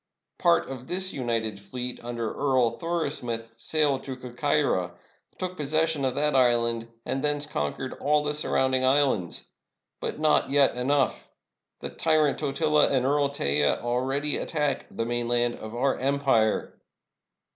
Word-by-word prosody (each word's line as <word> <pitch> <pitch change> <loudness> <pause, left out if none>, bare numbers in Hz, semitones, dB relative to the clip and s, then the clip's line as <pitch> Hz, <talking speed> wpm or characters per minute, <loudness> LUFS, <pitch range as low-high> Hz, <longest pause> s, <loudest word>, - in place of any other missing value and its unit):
Part 170 -1 +3
of 130 -1 -8
this 185 +1 -2
united 115 -5 -2
fleet, 125 +5 -6
under 120 -2 -3
Earl 130 -4 +2
Thoris 165 +1 -2
muth, 115 -1 -5
sailed 145 -1 +1
to 130 -2 -5
Corcyra, 125 -8 0 0.4
took 185 0 -4
possession 155 -1 0
of 130 - -1
that 150 -1 +1
island, 115 -2 +2 0.2
and 130 +2 -2
thence 145 0 +1
conquered 130 - -3
all 150 +1 +1
the 150 0 0
surrounding 130 -3 +1
islands. 130 - +1 0.5
But - - -3
not 155 -2 +3
yet 140 -2 +4
enough. 135 +2 0 0.5
The - - -4
tyrant 155 -3 +1
Totila 150 +1 +2
and 130 -2 +1
Earl 140 +1 +2
Teja 75 - +1
al 120 +1 -1
ready 140 +3 0
attack 150 -3 -2
the 115 - -3
mainland 120 0 0
of 110 +1 -8
our 135 +3 +1
empire." 135 -5 +1
135 Hz, 145 wpm, -26 LUFS, 120-150 Hz, 0.5 s, yet